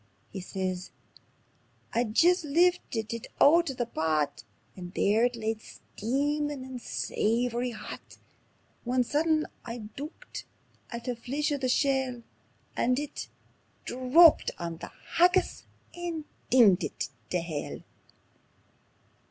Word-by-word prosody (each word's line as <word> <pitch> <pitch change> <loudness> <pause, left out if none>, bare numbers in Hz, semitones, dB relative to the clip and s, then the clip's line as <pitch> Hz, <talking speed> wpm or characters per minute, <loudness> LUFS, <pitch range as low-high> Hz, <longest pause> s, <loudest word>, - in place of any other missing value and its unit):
And - - -38
he 190 - -4
says: 185 -1 -3 1.0
"I'd 230 -2 0
jist 355 +4 +5
liftit 300 -8 +1
it 230 - -6
oot 335 +2 +6
o' - - -2
the 245 - -1
pot, 155 - -1 0.3
And 180 -1 -8
there 215 +4 +3
it 245 0 0
lay 225 -1 -1
steamin' 285 +6 -2
and 260 -2 -7
savoury 240 +3 0
hot, 230 - -9 0.7
When 250 +1 +2
sudden 310 +4 +1 0.2
I 230 0 -5 0.2
dooked 310 - -8 0.4
at 235 -1 -6
the 245 0 -2
fleech 275 +6 -2
o' 285 -2 -2
a 255 - +2
shell, 265 -2 +1 0.5
And 250 +1 +2
it 295 0 -4 0.6
_DRAPPED 265 +7 +6
ON 170 -1 -4
THE - - -8 0.3
HAGGIS 355 +1 +3 0.3
AND 345 -3 -4 0.3
DINGED 210 -7 +6
IT - - -3 0.2
TAE 180 - 0
HELL. 160 -3 -5
250 Hz, 125 wpm, -29 LUFS, 220-295 Hz, 1.0 s, oot